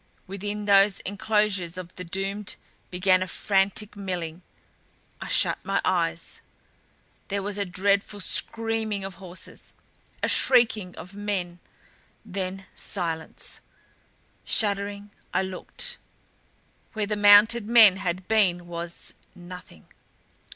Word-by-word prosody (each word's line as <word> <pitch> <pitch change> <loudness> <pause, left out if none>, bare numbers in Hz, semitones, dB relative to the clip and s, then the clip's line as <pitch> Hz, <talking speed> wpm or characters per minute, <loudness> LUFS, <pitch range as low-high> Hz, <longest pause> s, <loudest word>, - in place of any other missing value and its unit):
Within 205 +2 -5
those 200 -1 +5
enclosures 205 -4 -1
of 180 -1 -8
the 180 - -7
doomed 195 +3 -3 0.3
began 185 0 +3
a 185 - -1
frantic 200 +2 0
milling 180 -4 -5 0.8
I - - -5
shut - - +2
my - - 0
eyes - - -1 0.9
There 200 -1 -2
was 205 0 -3
a 200 - 0
dreadful 200 +2 0
screaming 220 0 -1
of 190 -2 -7
horses, 185 -1 -8 0.5
a - - +3
shrieking 225 -7 +4
of 180 - -10
men. 195 -4 -3 0.7
Then 190 -1 -4
silence. 165 -4 -4 0.8
Shuddering, 200 -1 0 0.2
I - - +3
looked. 190 - -3 0.9
Where 215 -2 -1
the 210 +1 -2
mounted 205 +2 +6
men 220 -5 +7
had 185 -1 -3
been 185 -6 +2
was 170 0 -6 0.2
nothing. 180 - -12
195 Hz, 110 wpm, -26 LUFS, 180-205 Hz, 0.9 s, men